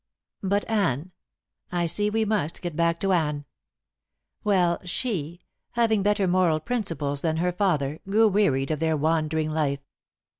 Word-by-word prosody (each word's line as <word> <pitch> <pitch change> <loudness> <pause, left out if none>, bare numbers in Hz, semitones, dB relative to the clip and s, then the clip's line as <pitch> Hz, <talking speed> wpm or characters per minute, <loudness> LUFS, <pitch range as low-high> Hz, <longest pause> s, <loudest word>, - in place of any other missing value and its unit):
But 200 +1 0
Anne 180 - 0 0.6
I 175 -1 0
see 205 +5 +3
we 220 +1 0
must 205 -8 -1
get 175 -3 -4
back 170 0 +1
to 195 -1 +2
Anne. 150 -4 0 1.0
Well, 180 -4 +2
she, 180 - -3 0.3
having 225 -3 +2
better 205 -1 +2
moral 175 -3 +2
principles 155 - -2
than 160 -1 0
her 180 +2 +1
father, 160 -6 0
grew 220 +3 +5
wearied 160 -10 +1
of 155 - -1
their 160 -1 +1
wandering 155 0 0
life. 140 -3 -1
170 Hz, 145 wpm, -25 LUFS, 155-200 Hz, 1.0 s, grew